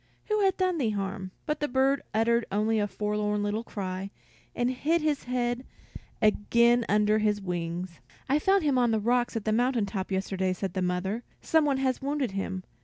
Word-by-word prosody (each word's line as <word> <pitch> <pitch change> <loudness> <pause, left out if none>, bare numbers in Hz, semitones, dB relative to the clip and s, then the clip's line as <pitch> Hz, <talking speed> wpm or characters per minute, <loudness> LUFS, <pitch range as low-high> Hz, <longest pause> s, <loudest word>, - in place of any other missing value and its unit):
Who 425 0 +2
hath 385 -2 +2
done 370 -3 +1
thee 240 -6 +1
harm?" 195 -2 -3 0.2
But 300 0 -1
the 295 - 0
bird 270 +2 +2
uttered 235 +2 +2
only 215 +2 +1
a 205 - +1
forlorn 210 0 -1
little 210 +2 -1
cry, 190 -3 -5 0.5
and 245 +1 +1
hid 310 +6 0
his 300 -2 0
head 245 0 -1 0.6
again 235 +3 +4
under 210 +1 +3
his 210 -1 +1
wings. 175 -1 -4 0.3
"I 280 +3 +3
found 385 +2 +3
him 280 -4 +2
on 240 -1 +3
the 220 -1 +2
rocks 240 +3 +1
at 225 - -3
the 215 - +1
mountaintop 220 -5 0
yesterday," 190 -1 0
said 185 0 -4
the 185 - -1
mother. 185 +5 -1 0.2
"Someone 295 -4 +2
has 260 -1 0
wounded 275 -4 -1
him. 190 -1 -3
225 Hz, 180 wpm, -28 LUFS, 195-260 Hz, 0.6 s, again